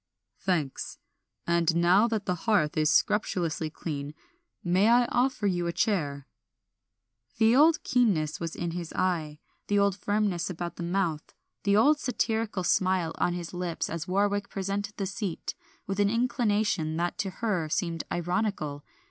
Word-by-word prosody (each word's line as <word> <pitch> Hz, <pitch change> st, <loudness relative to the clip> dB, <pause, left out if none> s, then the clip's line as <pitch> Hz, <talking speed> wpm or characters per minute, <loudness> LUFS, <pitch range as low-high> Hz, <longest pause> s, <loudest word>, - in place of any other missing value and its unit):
"Thanks; 165 Hz, -8 st, -2 dB, 0.5 s
and 170 Hz, -1 st, +2 dB
now 180 Hz, +6 st, +5 dB
that 220 Hz, -3 st, -2 dB
the 180 Hz, -, +1 dB
hearth 175 Hz, -5 st, +1 dB
is 155 Hz, -1 st, +2 dB
scrupulously 170 Hz, -6 st, +1 dB
clean 150 Hz, -2 st, -5 dB, 0.5 s
may 185 Hz, +4 st, +3 dB
I 240 Hz, +1 st, +5 dB
offer 245 Hz, -3 st, +1 dB
you 175 Hz, -3 st, +1 dB
a -, -, 0 dB
chair?" 155 Hz, -7 st, -1 dB, 1.1 s
The 225 Hz, +1 st, +5 dB
old 310 Hz, +3 st, +5 dB
keenness 195 Hz, -, +1 dB
was 165 Hz, -1 st, -4 dB
in 170 Hz, -1 st, -3 dB
his 170 Hz, -1 st, -5 dB
eye, 165 Hz, -5 st, -1 dB, 0.3 s
the 205 Hz, -, +2 dB
old 200 Hz, -1 st, +3 dB
firmness 205 Hz, -4 st, 0 dB
about 175 Hz, -1 st, -5 dB
the -, -, -6 dB
mouth, 170 Hz, -3 st, -2 dB, 0.3 s
the 200 Hz, 0 st, +4 dB
old 295 Hz, +7 st, +5 dB
satirical 225 Hz, -6 st, -1 dB
smile 185 Hz, -2 st, +1 dB
on 175 Hz, -, +2 dB
his 175 Hz, -1 st, -6 dB
lips 175 Hz, -2 st, -3 dB
as 165 Hz, -1 st, -4 dB
Warwick 200 Hz, +2 st, 0 dB
presented 200 Hz, +2 st, -3 dB
the 195 Hz, -, -1 dB
seat, 195 Hz, -2 st, -4 dB, 0.3 s
with 195 Hz, +1 st, -3 dB
an 200 Hz, -1 st, +4 dB
inclination 210 Hz, -, 0 dB
that 175 Hz, +4 st, -2 dB
to 200 Hz, -1 st, -1 dB
her 185 Hz, -5 st, -2 dB
seemed 165 Hz, 0 st, -1 dB
ironical. 175 Hz, -5 st, -2 dB
185 Hz, 150 wpm, -28 LUFS, 170-205 Hz, 1.1 s, now